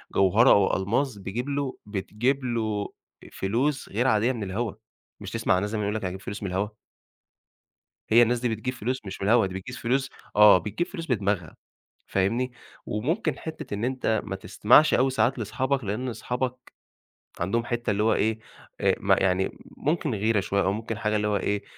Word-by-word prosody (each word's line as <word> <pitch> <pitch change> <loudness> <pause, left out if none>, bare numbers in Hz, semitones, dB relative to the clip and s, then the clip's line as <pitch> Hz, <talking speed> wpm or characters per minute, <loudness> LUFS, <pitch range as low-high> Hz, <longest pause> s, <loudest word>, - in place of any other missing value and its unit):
جوهرة 100 +7 +5
أو 100 -1 +4
ألماظ، 110 +5 0
بيجيب 105 +7 -4
له 140 -2 -2
بتجيب 110 +6 -1
له 110 -4 -1 0.4
فلوس 130 +9 -1
غير 120 +6 0
عادية 110 +1 +3
من 115 -5 -4
الهوا. 105 +3 -2 0.5
مش - - -7
تسمع - - +1
عن 90 - +1
ناس 105 - -2
زمان 105 0 -2
يقول 105 +1 -1
لك: 110 - -2
"أنا 95 - -2
هاجيب 95 +1 -8
فلوس 100 +2 -6
من 100 - -2
الهوا." 95 +3 -1 1.4
هي 115 +2 +7
الناس 120 +1 +2
دي 125 - 0
بتجيب 115 +3 -3
فلوس 125 +2 -2
مش 95 0 -7
من 100 - 0
الهوا، 115 -2 +5
دي 95 - -7
بتجيب 95 +7 -6
فلوس 135 +3 0 0.3
آه، 105 -2 +8
بتجيب 110 - -3
فلوس 165 -4 -7
بدماغها، 100 - -1 0.5
فاهمني، 115 +7 0 0.3
وممكن 155 - -1
حتّة 155 -7 -6
إن 105 +3 -2
أنت 125 -4 0
ما 95 - -4
تستمعش 125 +10 +4
أوي 130 +2 +3
ساعات 125 +1 +1
لأصحابك، 130 +4 -1
لإن 110 +6 -2
أصحابك 125 +2 -4 0.7
عندهم 100 +7 0
حتّة 120 -1 -2
اللي 105 0 +1
هو 110 +1 +3
إيه، 110 +1 +1 0.4
آآ - - +3
م - - +2
يعني 95 0 +1 0.2
ممكن 150 -5 0
غيرة 110 +1 +1
شوية 100 +1 0
أو 95 - +1
ممكن 110 +1 -4
حاجة 105 0 0
اللي 105 0 0
هو 105 - +1
إيه، 100 +1 -1
110 Hz, 185 wpm, -26 LUFS, 100-125 Hz, 1.4 s, آه